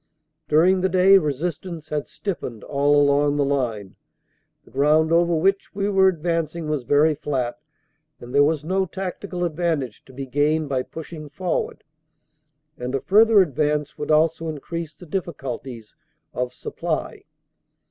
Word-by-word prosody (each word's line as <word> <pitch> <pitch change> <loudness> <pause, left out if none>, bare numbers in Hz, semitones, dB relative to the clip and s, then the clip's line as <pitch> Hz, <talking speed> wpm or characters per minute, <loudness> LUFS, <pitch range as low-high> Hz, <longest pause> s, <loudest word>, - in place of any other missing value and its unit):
"During 180 +5 +4
the 190 - +2
day 190 +1 +6
resistance 160 +1 -4
had 150 -1 -2
stiffened 165 - -5
all 145 +1 +2
along 145 0 +3
the 145 - +2
line. 120 -8 -2 0.7
The - - -19
ground 155 +4 +3
over 170 0 +3
which 195 +5 0
we 200 0 0
were 190 -1 +4
advancing 165 -2 -1
was 150 -2 -1
very 150 +5 +4
flat, 135 -2 -3 0.6
and 120 +1 -10
there 140 +1 +6
was 150 0 +1
no 190 +3 0
tactical 185 0 -5
advantage 155 -8 -2
to - - -15
be 135 +1 -6
gained 145 +3 +1
by 130 -2 0
pushing 155 +1 -9
for 175 +4 -1
ward, - - -14 1.0
and 125 +2 -3
a - - +1
further 215 0 +6
advance 150 -1 -1
would 150 - -4
also 160 +1 +2
increase 160 +1 -6
the 180 - -13
difficulties 135 - -5 0.4
of 125 0 -2
supply. - - -4
155 Hz, 145 wpm, -23 LUFS, 140-175 Hz, 1.0 s, day